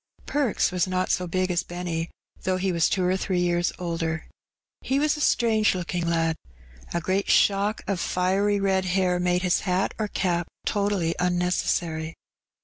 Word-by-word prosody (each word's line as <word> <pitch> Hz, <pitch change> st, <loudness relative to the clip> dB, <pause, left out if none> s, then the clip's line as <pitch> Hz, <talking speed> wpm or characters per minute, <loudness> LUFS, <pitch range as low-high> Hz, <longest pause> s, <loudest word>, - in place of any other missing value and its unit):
Perks 280 Hz, -10 st, +1 dB
was 180 Hz, 0 st, +1 dB
not 185 Hz, 0 st, 0 dB
so 180 Hz, -, 0 dB
big 185 Hz, +1 st, 0 dB
as 175 Hz, -1 st, +1 dB
Benny, 175 Hz, -2 st, -4 dB, 0.3 s
though 185 Hz, 0 st, 0 dB
he 190 Hz, +1 st, 0 dB
was 170 Hz, -2 st, +2 dB
two 185 Hz, -, 0 dB
or 185 Hz, +1 st, +2 dB
three 190 Hz, -1 st, -1 dB
years 175 Hz, 0 st, +1 dB
older. 165 Hz, -2 st, -3 dB, 0.6 s
He 265 Hz, -, 0 dB
was 300 Hz, +1 st, +2 dB
a 300 Hz, -, -5 dB
strange 220 Hz, -7 st, +3 dB
looking 175 Hz, -1 st, -2 dB
lad. 165 Hz, -1 st, +1 dB, 0.5 s
A 170 Hz, -, 0 dB
great 185 Hz, +4 st, -1 dB
shock 200 Hz, +2 st, +3 dB
of 195 Hz, -3 st, -1 dB
fiery 195 Hz, +4 st, +1 dB
red 190 Hz, -1 st, +1 dB
hair 180 Hz, -1 st, +1 dB
made 180 Hz, 0 st, +1 dB
hat 180 Hz, +1 st, +1 dB
or 215 Hz, -, 0 dB
cap 175 Hz, -4 st, -1 dB, 0.2 s
totally 200 Hz, -5 st, 0 dB
unnecessary. 175 Hz, -2 st, 0 dB
180 Hz, 160 wpm, -25 LUFS, 175-195 Hz, 0.6 s, strange